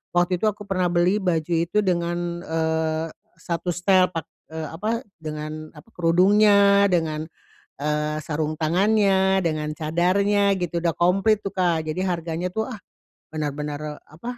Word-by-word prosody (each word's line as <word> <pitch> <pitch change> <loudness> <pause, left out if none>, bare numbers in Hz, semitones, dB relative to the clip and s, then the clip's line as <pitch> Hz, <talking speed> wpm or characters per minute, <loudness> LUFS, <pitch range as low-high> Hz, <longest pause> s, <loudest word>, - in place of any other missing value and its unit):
waktu 175 0 +2
itu 215 - +1
aku 210 0 -2
pernah 185 -3 0
beli 175 +4 +2
baju 175 -4 -1
itu 175 +6 +1
dengan, 175 -1 -1
eee, 160 -1 -1 0.3
1 170 +1 -5
setel, 185 0 +4
pak 165 - -2 0.3
eee, 160 -1 -5
apa, 215 +9 -2 0.2
dengan 155 0 -6
apa, 150 +4 -16
kerudungnya, 200 +3 +5
dengan, 160 -3 0 0.6
eee, 150 +1 -1
sarung 155 0 -2
tangannya, 190 +3 +3
dengan 155 -4 -1
cadarnya, 185 +6 +1
gitu, 170 -1 -2
udah 170 - +2
komplit 195 +6 +2
tuh, 195 - -6
Kak. 170 -4 +1
Jadi 155 +4 -2
harganya 175 -1 -2
tuh, 220 +3 -2
ah, 255 - -6 0.6
bener-bener 150 0 -4
apa, 235 +11 -8
175 Hz, 140 wpm, -23 LUFS, 155-190 Hz, 0.6 s, kerudungnya